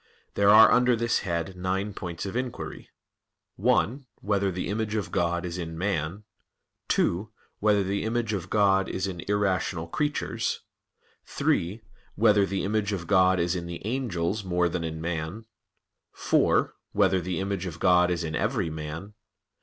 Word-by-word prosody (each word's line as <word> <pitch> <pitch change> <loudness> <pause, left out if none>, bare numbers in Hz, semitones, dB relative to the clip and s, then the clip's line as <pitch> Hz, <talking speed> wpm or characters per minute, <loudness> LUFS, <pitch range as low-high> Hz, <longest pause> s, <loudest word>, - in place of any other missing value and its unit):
There 100 0 +3
are 110 +2 +9
under 125 0 +4
this 115 +1 +1
head 85 0 -3
nine 95 +3 -2
points 85 -1 -5
of 95 - -5
inquiry: 125 -1 -5 0.7
(1) 130 +4 +1
Whether 100 -1 +1
the 90 0 -3
image 105 +1 -2
of 95 -5 -2
God 85 +1 0
is 90 0 -4
in 80 -1 -5
man? 95 +1 -2 0.6
(2) 100 +5 +1 0.3
Whether 105 -1 +3
the 100 +1 -1
image 115 0 -1
of 95 -2 -4
God 95 -2 +3
is 95 - -2
in 95 -3 -5
irrational 95 -4 0
creatures? 145 - -2 0.7
(3) 100 +7 -1 0.3
Whether 105 -2 +4
the 95 +1 -2
image 105 0 0
of 90 -4 -4
God 95 0 +4
is 85 +1 +1
in 85 -1 -4
the 85 +2 -7
angels 110 -5 -1
more 90 -1 +1
than 85 0 -3
in 80 -1 -4
man? 85 +6 -4 0.7
(4) - - +2 0.2
Whether 95 -2 +3
the 90 0 -3
image 95 -1 -2
of 85 - -6
God 90 -1 +4
is 90 -1 -1
in 80 -1 -3
every 80 - 0
man? 80 +6 -6
95 Hz, 160 wpm, -27 LUFS, 85-105 Hz, 0.7 s, are